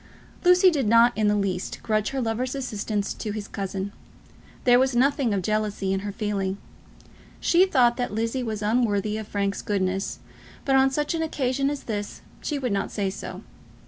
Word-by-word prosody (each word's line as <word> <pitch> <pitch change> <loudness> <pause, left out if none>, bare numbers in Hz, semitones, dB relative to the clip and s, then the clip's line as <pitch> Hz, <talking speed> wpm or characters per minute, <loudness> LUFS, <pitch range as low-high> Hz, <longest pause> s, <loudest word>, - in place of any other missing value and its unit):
Lucy 360 +1 +6
did 275 -8 0
not 230 +2 +5
in 215 0 +1
the 210 - +3
least 190 -3 -2
grudge 215 -1 +1
her 270 - -3
lover's 250 +2 -1
assistance 210 -5 -2
to 215 - -5
his 205 -1 -5
cousin. 195 0 -4 0.7
There 245 -2 +6
was 260 -1 +2
nothing 270 -1 +2
of 195 -2 0
jealousy 210 -2 -1
in 195 - 0
her 205 +1 -4
feeling. 200 -2 -2 0.8
She 360 +3 +4
thought 245 -8 +3
that 245 - -2
Lizzie 230 +4 -1
was 220 -3 -3
unworthy 215 -2 +1
of 215 - -7
Frank's 200 -1 -1
goodness, 195 -2 -1 0.5
but 270 - +3
on 265 0 +5
such 295 +4 -1
an 330 - -1
occasion 275 -3 0
as 290 -1 -4
this 205 -2 -5 0.2
she 295 - -2
would 255 -4 -2
not 195 -1 -1
say 195 -2 -2
so. 195 - -7
220 Hz, 180 wpm, -25 LUFS, 205-265 Hz, 0.8 s, Lucy